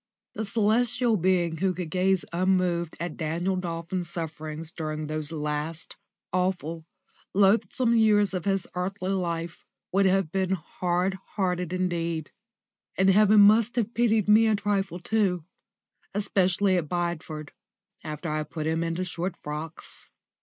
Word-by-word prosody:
The 220 - -3
celestial 225 +3 +2
being 175 -3 +1
who 185 +1 0
could 175 -2 -5
gaze 190 0 +2
unmoved 180 -2 +1
at 170 -1 -4
Daniel 170 +4 -1
Dolphin's 170 0 -3
sufferings 155 -1 -5
during 155 -2 -4
those 155 0 -3
last, 150 +1 -4 0.4
awful, 175 -3 -1 0.5
loathsome 210 +4 +3
years 210 -3 +4
of 180 -3 -3
his 195 -2 +1
earthly 185 +1 -2
life 170 -3 -3 0.3
would 195 +1 +3
have 190 -4 +2
been 190 0 0
hard 180 +2 -1 0.2
hearted 180 -3 -1
indeed. 170 -3 -2 0.7
And 190 +1 +5
heaven 210 +1 +6
must 215 +3 +5
have 230 -1 -1
pitied 225 -3 +2
me 220 +2 +6
a 220 - +3
trifle 200 -3 -1
too 180 -3 0 0.7
especially 195 -1 +2
at 155 -4 -2
Bideford, 170 -3 -3 0.5
after 155 +1 -5
I 155 -1 -1
had 155 -1 -4
put 155 -2 -4
him 160 +1 0
into 165 +2 -2
short 180 0 -3
frocks. 150 +2 -7
180 Hz, 140 wpm, -27 LUFS, 165-195 Hz, 0.7 s, heaven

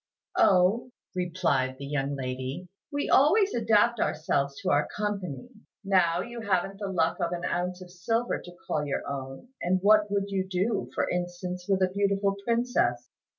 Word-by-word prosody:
"Oh," 195 +6 +4 0.2
replied 170 -8 0
the 140 - -7
young 140 0 -1
lady, 130 +5 -4 0.2
"we 285 0 -1
always 390 +9 +4
adapt 225 0 +3
ourselves 140 -4 0
to - - +1
our 145 +1 +3
company. 205 - -4 0.3
Now 180 -3 +3
you 235 +1 -7
haven't 195 -1 0
the 205 - -3
luck 170 -4 0
of 170 - 0
an 175 0 -3
ounce 180 +1 -2
of 180 - -14
silver 225 +7 -1
to 175 0 -12
call 150 - -1
your 145 -2 -3
own; 135 - -6
and 185 +2 +1
what 210 0 +5
would 200 0 -1
you 190 -1 -1
do, 190 +5 0
for - - +1
instance, 180 0 -4
with 190 -1 +3
a 185 - +2
beautiful 200 0 +1
princess? 230 - 0
185 Hz, 165 wpm, -28 LUFS, 165-205 Hz, 0.3 s, what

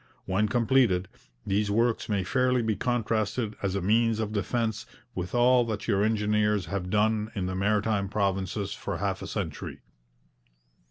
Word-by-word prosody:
When 95 +3 +1
completed, 115 -6 +2 0.4
these 105 +2 +1
works 115 +3 +1
may 100 -3 +1
fairly 125 +3 +1
be 110 -1 0
contrasted 110 -1 -1
as 100 -1 -1
a 100 - -1
means 110 +2 +2
of 110 -1 -2
defence 110 +2 -1 0.3
with 90 +5 -4
all 125 +1 +5
that 110 -2 -4
your 100 -3 +2
engineers 105 -2 +1
have 90 +1 -3
done 110 +1 +1
in 95 -3 -1
the 95 - -2
Maritime 100 +1 +1
Provinces 100 0 -1
for - - -4
half - - -2
a - - -5
century.' - - -5
105 Hz, 155 wpm, -27 LUFS, 100-115 Hz, 0.4 s, all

